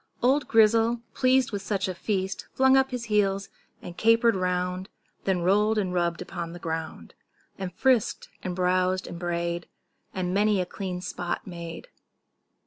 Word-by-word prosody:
Old 270 +3 +3
Grizzle, 225 +1 +4
pleased 255 -1 +3
with 205 -2 -3
such 195 -1 -1
a 185 - -2
feast, 190 +1 -2
Flung 265 0 +5
up 265 0 +4
his 250 -2 -4
heels, 200 -3 +1 0.3
and 175 - -8
caper'd 230 +2 +4
round, 180 +1 -1 0.4
Then 185 -3 +1
roll'd 210 +4 +3
and 190 -3 0
rubb'd 175 -1 0
upon 170 -2 -6
the 175 - -8
ground, 160 -1 -5 0.5
And 190 -2 -4
frisk'd 250 +3 +1
and 180 -1 -4
browsed 185 0 +1
and 170 - -7
bray'd, 170 -1 -2 0.4
And 180 -1 -2
many 205 0 +3
a 180 - 0
clean 180 -1 -5
spot 175 -1 -4
made. 170 -2 -8
190 Hz, 155 wpm, -26 LUFS, 180-220 Hz, 0.5 s, Flung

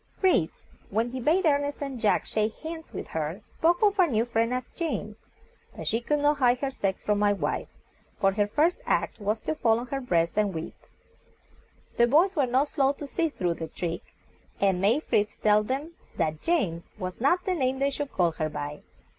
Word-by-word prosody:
Fritz, 355 - +2 0.3
when 225 +4 0
he 260 - -4
bade 330 +9 +2
Ernest 285 -1 +1
and 275 -3 -4
Jack 215 - +2
shake 215 +4 -2
bands 320 0 -6
with - - -6
her, 160 +4 -3
spoke 340 - 0
of 410 -1 +3
our 365 - +6
new 230 -5 +1
friend 230 0 0
as 255 0 -2
James, 235 - -3 0.6
but - - -7
she 225 +2 +1
could 295 +5 +1
not 290 0 +2
hide 250 -1 +4
her 270 +1 -2
sex 195 -7 -2
from 210 -1 +1
my 205 0 +4
wife, 200 - -2 0.5
for 195 - +4
her 205 +1 +1
first 305 +11 +1
act - - 0
was 210 +2 -1
to - - -1
fall 225 -7 +2
on 240 - -4
her 270 +2 -3
breast 170 -8 +1
and 205 -4 +1
weep. 160 +1 -5 1.2
The 235 - +5
boys 340 +9 +4
were 280 -5 +2
not 260 +4 +2
slow 275 -3 +2
to 290 - -8
see 325 +3 0
through 180 - -1
the 165 -1 -6
trick, 165 +1 -4 0.6
and 190 -2 +2
made 230 +10 +3
Fritz 210 0 +1
tell 210 0 +5
them 270 +9 -3 0.2
that 155 -1 -1
"James" 190 - 0
was 185 +1 -5
not 350 +7 +2
the 370 - +1
name 265 -5 0
they 275 +1 +1
should 285 0 -4
call 175 -2 +2
her 155 -1 -2
by. 145 0 -5
240 Hz, 205 wpm, -27 LUFS, 200-290 Hz, 1.2 s, our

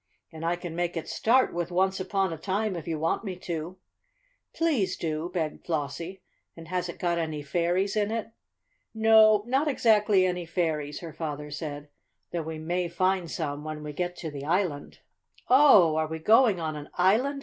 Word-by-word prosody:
And 160 -1 -9
I 170 +1 +1
can 175 -2 -7
make 175 0 -2
it 165 - -4
start 255 +4 +2
with 175 0 -2
'once 190 +2 +1
upon 190 -1 -1
a - - -6
time,' 200 +3 -1
if 170 -2 -7
you 165 -2 -2
want 165 +7 -1
me 190 -4 -4
to." 175 0 -5 0.7
"Please 265 - 0
do," 160 +1 -3
begged 160 -4 -3
Flossie. 165 +4 -4 0.3
"And 165 0 -11
has 180 -1 -2
it - - -7
got 170 -2 0
any 155 -3 -3
fairies 175 +6 0
in 210 -1 +1
it?" 225 0 -3 0.6
"No, 220 -1 +6
not 265 +5 +1
exactly 210 -7 +3
any 180 -2 -2
fairies," 155 -4 -2
her 165 -3 -8
father 150 -2 -5
said; 145 -1 -6 0.4
"though 170 - -2
we 160 0 -6
may 175 +3 -2
find 185 0 0
some 145 -3 -4
when 155 -1 -6
we 150 0 -6
get 180 +3 -3
to 160 -3 -6
the 140 -1 -7
island." 165 -2 -2 0.5
"Oh, 250 - +7
are 160 0 +1
we 160 +1 -5
going 215 +3 +4
on 160 -2 -3
an 150 0 -8
island?" 230 +10 +2
175 Hz, 185 wpm, -27 LUFS, 160-195 Hz, 0.7 s, Oh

